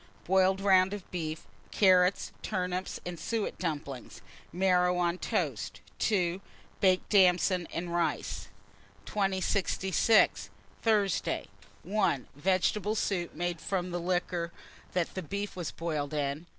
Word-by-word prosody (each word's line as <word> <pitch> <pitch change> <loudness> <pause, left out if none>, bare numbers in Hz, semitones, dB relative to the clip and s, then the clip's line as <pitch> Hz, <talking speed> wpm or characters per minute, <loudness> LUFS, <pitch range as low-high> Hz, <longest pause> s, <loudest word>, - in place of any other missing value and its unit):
Boiled 190 +1 +3
round 190 0 +4
of 200 - -11
beef, 160 -3 -4 0.2
carrots, 185 -1 +4
turnips, 185 -2 -2
and 175 -2 -5
suet 220 +5 -2
dumplings; 145 -6 -5 0.3
marrow 180 0 +3
on 175 0 0
toast. - - -2 0.2
2. 185 -3 +1 0.4
Baked 185 -1 +3
damsons 180 -2 +4
and 170 0 -4
rice. 170 -3 -1 0.6
2066. 195 +1 +2 0.3
Thursday. 205 -8 +1 0.4
1. 190 - 0
Vegetable 190 +6 +1
soup, 185 -5 -1
made 175 0 -2
from 185 -2 -2
liquor 175 -1 -1 0.4
that 180 -1 -2
beef 200 +1 -3
was 175 -3 -3
boiled 155 -3 -3
in. 145 +3 -2
180 Hz, 110 wpm, -30 LUFS, 170-190 Hz, 0.6 s, round